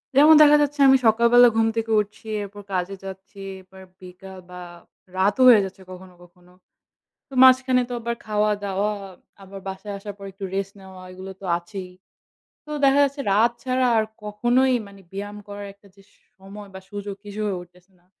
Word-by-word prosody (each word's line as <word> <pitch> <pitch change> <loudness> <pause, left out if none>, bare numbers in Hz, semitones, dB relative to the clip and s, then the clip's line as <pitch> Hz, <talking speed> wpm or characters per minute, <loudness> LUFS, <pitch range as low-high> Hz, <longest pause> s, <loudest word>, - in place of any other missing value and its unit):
যেমন 300 +3 +7
দেখা 295 0 +7
যাচ্ছে 290 0 -1
আমি 265 0 +7
সকালবেলা 235 +2 +6
ঘুম 225 - +3
থেকে 225 0 -2
উঠছি, 210 +2 -6 0.2
এরপর 205 +1 -10
কাজে 185 +2 -2
যাচ্ছি, 195 +1 -10 0.2
এরপর 190 +1 -17 0.2
বিকাল 185 +1 -12
বা 180 0 -9 0.6
রাতও 205 +7 +2
হয়ে 215 -5 +7
যাচ্ছে 190 0 -10
কখনো, 185 0 -12
কখনো। 175 0 -22 0.8
তো - - -15
মাঝখানে 255 0 +5
তো 245 - -5
আবার 235 +1 -3
খাওয়া-দাওয়া, 210 -1 -1 0.5
আবার 195 +1 -10
বাসায় 195 +2 -6
আসার 205 +1 -8
পরে 195 -1 -9
একটু 195 +1 -7
rest 195 0 -3
নেওয়া 190 -1 -13
এগুলো 190 +1 -9
তো - - -8
আছেই। 185 +1 -9 0.8
তো 300 - -13
দেখা 275 +1 +5
যাচ্ছে 280 +1 -4
রাত 225 +4 +4
ছাড়া 255 -1 0
আর 220 - +2 0.2
কখনোই 240 +5 +1
মানে 200 -1 -15
ব্যায়াম 205 +1 -6
করার 205 0 -7
একটা 200 0 -24
যে 195 - -19 0.4
সময় 200 +2 -11
বা 190 - -8
সুযোগ 205 -1 -6
কিছু 205 +1 -7
হয়ে 195 -3 -2
উঠতেছে 180 +2 -21
না। 175 - -35
205 Hz, 175 wpm, -23 LUFS, 190-235 Hz, 0.8 s, যেমন